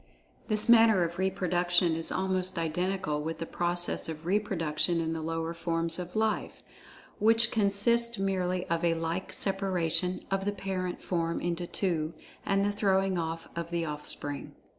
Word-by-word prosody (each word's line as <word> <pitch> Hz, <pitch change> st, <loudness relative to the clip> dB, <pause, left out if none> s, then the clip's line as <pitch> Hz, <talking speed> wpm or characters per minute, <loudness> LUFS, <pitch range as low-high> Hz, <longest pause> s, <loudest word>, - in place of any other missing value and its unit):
This 215 Hz, 0 st, +3 dB
manner 225 Hz, -5 st, +6 dB
of 170 Hz, +2 st, -4 dB
reproduction 180 Hz, -2 st, +1 dB
is 165 Hz, 0 st, +1 dB
almost 185 Hz, -1 st, -1 dB
identical 165 Hz, -1 st, -1 dB
with 160 Hz, +2 st, -4 dB
the 165 Hz, -, -4 dB
process 175 Hz, 0 st, +1 dB
of 160 Hz, 0 st, -7 dB
reproduction 175 Hz, -4 st, 0 dB
in 165 Hz, 0 st, -1 dB
the 160 Hz, -, -4 dB
lower 165 Hz, +1 st, -3 dB
forms 165 Hz, 0 st, +1 dB
of 180 Hz, +2 st, -6 dB
"life," 220 Hz, 0 st, -1 dB, 0.6 s
which 225 Hz, +1 st, +4 dB
consist 230 Hz, +3 st, +2 dB
merely 185 Hz, -2 st, -1 dB
of 170 Hz, 0 st, -1 dB
a 170 Hz, -1 st, +3 dB
like 165 Hz, +3 st, -3 dB
separation 185 Hz, -2 st, 0 dB
of 195 Hz, 0 st, 0 dB
the 205 Hz, -, 0 dB
parent 185 Hz, -2 st, -4 dB
form 170 Hz, -2 st, -1 dB
into 175 Hz, 0 st, -2 dB
two, 165 Hz, -5 st, -2 dB, 0.3 s
and 195 Hz, 0 st, +2 dB
the 205 Hz, -, +1 dB
throwing 195 Hz, -3 st, +1 dB
off 165 Hz, 0 st, -4 dB
of 170 Hz, 0 st, -4 dB
the 170 Hz, -1 st, -1 dB
offspring. 150 Hz, -1 st, -5 dB
180 Hz, 155 wpm, -29 LUFS, 165-195 Hz, 0.6 s, manner